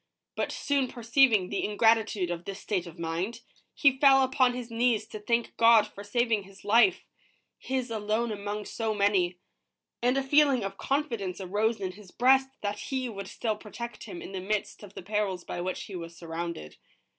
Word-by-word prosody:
But - - -1
soon 280 -2 0
perceiving 235 -5 +3
the 200 - -2
ingratitude 215 -3 +2
of 175 0 -5
this 195 +1 -6
state 185 -5 -2
of 170 +1 -11
mind, 170 +8 -3 0.3
he 275 -3 +4
fell 270 -1 +7
upon 255 -1 +2
his 245 -2 -6
knees 230 -2 +1
to 215 - -7
thank 235 +3 -1
God 230 -2 +6
for 200 -1 -11
saving 225 +1 +1
his 195 0 -16
life, 230 - +4 0.3
— - - -41 0.2
his 260 -2 -3
alone 220 +2 -1
among 205 0 -4
so 220 0 -2
many, 195 -3 +2 0.3
— - - -60
and 250 +2 +2
a 275 - +1
feeling 275 -3 +4
of 195 0 -4
confidence 230 -11 -2
arose 210 +4 0
in 185 -2 -3
his 200 0 -14
breast 265 +5 +4
that 205 0 -3
He 260 +2 -3
would 200 -3 -7
still 220 +2 -2
protect 235 +3 -8
him 350 0 -8
in - - -8
the 190 -1 -4
midst 205 +2 -2
of 205 -2 -12
the - - -8
perils 200 -2 -1
by 175 - -5
which 185 +1 -3
he 195 - -9
was 170 -1 -8
surrounded. 165 - -6
215 Hz, 190 wpm, -28 LUFS, 195-240 Hz, 0.3 s, fell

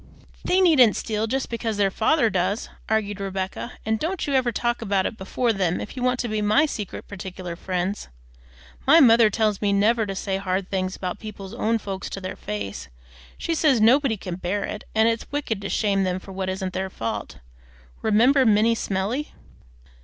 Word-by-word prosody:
"They 370 +1 +3
needn't 275 - +6
steal 220 0 -2
just 265 +3 -1
because 230 -2 -3
their 200 -1 +2
father 230 +3 +2
does," 185 +3 -1 0.2
argued 210 -2 0
Rebecca; 195 +4 -4
"and 220 0 0
don't 355 +3 -2
you 285 - -2
ever 255 -2 +2
talk 240 +2 -1
about 200 -3 +1
it - - -2
before 225 +4 -1
them 185 -4 0
if 210 - -7
you 255 - -5
want 250 0 +1
to 240 - -2
be 215 -1 -1
my 215 +9 +4
secret, 210 - -6
partic'lar 185 -3 -7
friends. 185 +3 -3 0.8
My 320 +5 +8
mother 230 -5 +7
tells 215 -1 0
me 205 -1 +2
never 215 +2 +2
to 195 - -4
say 190 0 -2
hard 190 -1 -2
things 185 -1 -1
about 180 -1 -4
people's 200 -3 -8
own 230 +1 +1
folks 195 -3 -5
to - - -5
their 185 -1 -5
face. 100 -5 -5 0.5
She 335 - -2
says 300 -6 +3
nobody 240 +1 +4
can 180 -2 -6
bear 190 +3 -2
it, 210 - -5
and 220 +1 +4
it's 230 0 -1
wicked 270 -8 -2
to 200 - -4
shame 200 -2 +1
them 185 -1 0
for 195 - -12
what 190 0 -3
isn't 190 0 -3
their 190 +1 -2
fault. 115 -10 -5 0.6
Remember 245 +6 +4
Minnie 220 0 +4
Smellie!" 220 +7 -2
210 Hz, 190 wpm, -24 LUFS, 190-235 Hz, 0.8 s, My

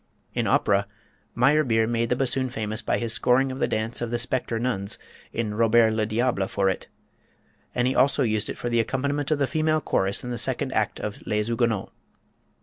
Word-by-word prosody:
In - - -1
opera, 100 0 +2 0.5
Meyerbeer 125 -3 +3
made 115 0 0
the 125 - +2
bassoon 130 0 0
famous 110 -2 -3
by - - 0
his 115 -2 +2
scoring 125 +2 +3
of 130 - -6
the - - +1
dance 110 +3 -2
of 120 - -2
the 120 - -1
Spectre 125 -1 0
Nuns 110 -5 -1 0.3
in 110 -3 -2
"Robert 115 +1 +4
le 110 -1 0
Diable" 110 -3 0
for 95 0 +1
it, - - -6 0.9
and 125 0 +2
he 130 - +1
also 140 +1 +3
used 110 -3 0
it - - -5
for - - -4
the 120 -1 +1
accompaniment 140 +5 -1
to 155 - +2
the 140 -1 +1
female 155 +2 +1
chorus 100 -8 0
in 125 - -5
the 120 - -3
second - - +1
act - - 0
of 105 - -5
"Les 105 0 0
Huguenots." 115 -3 0
120 Hz, 200 wpm, -25 LUFS, 110-130 Hz, 0.9 s, Robert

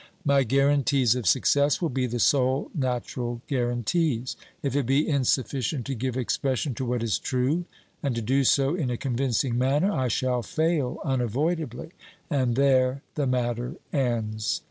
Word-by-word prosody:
My 140 -1 +4
guarantees 135 -1 +3
of 125 -6 -3
success 145 - +3
will 170 - 0
be 130 0 -1
the 120 0 -3
sole 130 +2 +2
natural 125 -3 -3
guarantees. 125 +1 0 0.3
If 140 -1 -1
it 140 -4 +1
be 135 +3 +2
insufficient 130 -2 0
to 140 - -3
give 130 +1 -3
expression 130 +2 -1
to 130 - -4
what 120 -1 -1
is 115 -3 0
true, 135 +7 0 0.4
and 140 -5 -1
to 115 - -2
do 135 +5 +2
so 135 +2 +3
in 160 -8 -1
a 120 - -2
convincing 125 -1 0
manner, 145 +10 +2
I 130 -9 0
shall 125 +1 0
fail 155 - 0
unavoidably, 135 +3 -1 0.4
and 130 -5 +1
there 130 0 +2
the 145 -3 -1
matter 125 +2 -1 0.2
ends. 115 -5 -1
130 Hz, 155 wpm, -26 LUFS, 120-140 Hz, 0.4 s, My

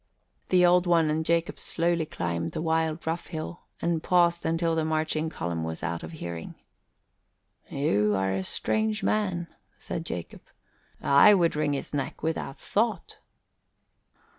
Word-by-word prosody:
The 180 -1 +5
Old 180 0 +4
One 165 -3 +4
and 160 +1 0
Jacob 170 +1 0
slowly 170 -1 0
climbed 85 - -3
the - - -3
wild, 160 0 0
rough 165 +2 -2
hill 165 +1 -6
and 170 -2 0
paused 170 -1 +2
until 165 0 +1
the 160 -1 +1
marching 155 0 0
column 85 - -3
was 80 0 -5
out 85 +1 -2
of - - -8
hearing. 85 - -6 1.1
"You 105 -7 +1
are 95 0 0
a 95 0 -1
strange 215 - -1
man," 185 -5 0 0.3
said 165 - -4
Jacob. 90 - -6 0.6
"I 140 +9 +7
would 170 -4 +2
wring 150 -1 +1
his 140 - -4
neck 145 0 -3
without 160 -4 -2
thought." 220 +1 -1
160 Hz, 145 wpm, -27 LUFS, 140-170 Hz, 1.1 s, I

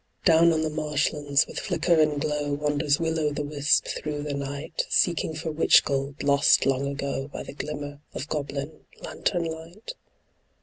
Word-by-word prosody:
Down 170 -1 +6
on 160 -1 +1
the 155 - -1
marshlands 150 -1 +1
with - - -6
flicker 175 -1 0
and 150 -2 +2
glow 150 -1 -1
Wanders 145 0 +1
Will 165 -1 -1
o' 150 -1 +1
the 145 0 -3
Wisp 145 0 +2
through 150 -1 -4
the 150 -1 -3
night. 140 +1 -4
Seeking 165 -2 +1
for 160 +1 -4
witch 155 +2 +5
gold 140 0 -2
lost 140 0 +4
long 135 0 +1
ago 140 -1 -3
By 145 - -7
the - - -9
glimmer 145 0 -6 0.2
of 140 - -4
goblin 145 0 -4 0.2
lantern 175 -3 -1
light. 165 - -7
150 Hz, 170 wpm, -26 LUFS, 140-160 Hz, 0.2 s, Down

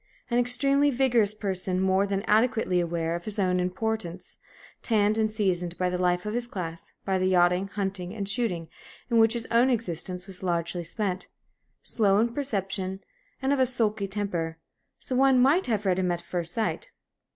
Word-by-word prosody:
An 240 - +3
extremely 275 +4 +3
vigorous 240 -6 +2
person, 190 -3 -2
more 190 +1 +2
than 195 0 -1
adequately 220 -4 +2
aware 170 -1 -1
of 175 - -6
his 215 -1 -5
own 185 -2 +1
importance, 185 -1 -3 0.4
tanned 215 -2 +2
and 220 -1 +1
seasoned 180 -5 -1
by 180 -1 0
the 180 - -1
life 180 0 +1
of 210 - -3
his 240 0 -1
class, 170 -7 -6
by 190 -1 +1
the 185 - +1
yachting, 180 +1 +3
hunting, 195 -3 -3
and 200 -3 -4
shooting 200 -7 0 0.4
in 230 - +4
which 225 0 +5
his 235 -1 -2
own 235 +3 +4
existence 180 -6 -2
was 195 -2 -7
largely 175 -1 -1
spent, 185 +1 -3 0.6
slow 200 -4 +2
in 230 +2 +1
perception, 195 -7 -2 0.4
and 270 +1 +2
of 280 - 0
a 260 - +5
sulky 215 -5 0
temper 180 -5 -3 0.4
so 255 - -4
one 265 0 +5
might 280 +8 +4
have 215 -3 -1
read 185 -1 +2
him 180 -1 +1
at 175 - -1
first 170 -1 -3
sight. 230 - -2
200 Hz, 180 wpm, -27 LUFS, 180-230 Hz, 0.6 s, which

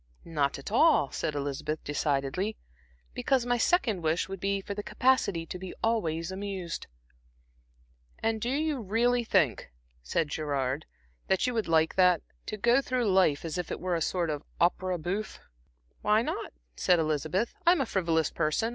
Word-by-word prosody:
"Not 145 -4 0
at 140 - -8
all," 270 - +4
said 150 - -2
Elizabeth, 145 +2 -3
decidedly, 145 +8 -1 0.6
"because 260 - +1
my 245 0 +1
second 230 - +2
wish 160 +1 0
would 195 0 -6
be 195 +1 0
for 200 +1 -5
the 205 - -4
capacity 205 -8 +1
to 180 - -7
be 185 0 -7
always 170 -7 0
amused." 190 -3 -5 1.3
"And 225 -1 -1
do 240 - -1
you 295 +1 0
really 235 +4 +2
think," 185 - +1 0.3
said 145 - -1
Gerard, 140 -1 -2 0.4
"that 190 +3 +2
you 250 - 0
would 225 -2 -1
like 160 -1 +3
that 180 -3 +5 0.2
to 215 - -4
go 240 +5 +4
through 250 -5 0
life 170 -6 +3
as 165 +2 -3
if 175 - -4
it - - -4
were 180 -1 -1
a 165 - -1
sort 170 0 0
of 145 -1 -3 0.2
opera 180 +1 +2
bouffe?" 190 +6 -4 0.6
"Why 215 +2 +3
not?" - - -4 0.2
said 180 - +3
Elizabeth. 155 +7 0
"I'm 350 0 +6
a - - +1
frivolous 165 - +1
person. 155 +9 0
185 Hz, 165 wpm, -29 LUFS, 155-225 Hz, 1.3 s, I'm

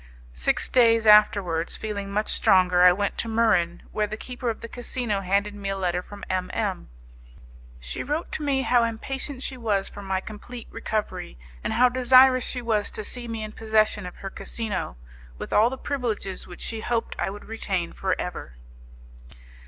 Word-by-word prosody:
Six 60 0 +1
days 230 -2 +4
afterwards, 200 -6 +5
feeling 205 -2 -4
much 210 +2 0
stronger, 180 -1 +4
I 180 0 +9
went 200 +3 -1
to - - -1
Muran, 220 -7 +2
where 210 -1 0
the 215 - -5
keeper 250 +1 -4
of 225 - -4
the 230 - -6
casino 235 -3 -3
handed 200 +2 0
me 200 -1 -5
a 195 - -2
letter 180 -2 0
from 200 +2 -12
M 185 -1 -1
M. 200 - -2 0.9
She - - -5
wrote 300 +5 -3
to - - -4
me 275 -2 +1
how 245 -2 +4
impatient 260 +4 -4
she 260 - -4
was 210 -5 0
for 205 - -10
my 190 -1 -1
complete 220 +4 -9
recovery, 215 - -3 0.3
and - - -1
how 250 +2 +5
desirous 255 0 +6
she 250 -2 -4
was 215 -3 0
to 215 - -5
see 240 +3 -4
me 225 -1 -4
in 215 - -6
possession 215 -3 +1
of 180 - -9
her 195 - -7
casino, 210 - -4 0.4
with - - -6
all 220 +3 +5
the 265 - -5
privileges 235 -9 -3
which 175 - -11
she 225 - -3
hoped 235 0 -1
I - - 0
would 205 +1 -9
retain 195 -6 -3
for 190 -1 -1
ever. 175 - -5
215 Hz, 185 wpm, -25 LUFS, 195-235 Hz, 0.9 s, I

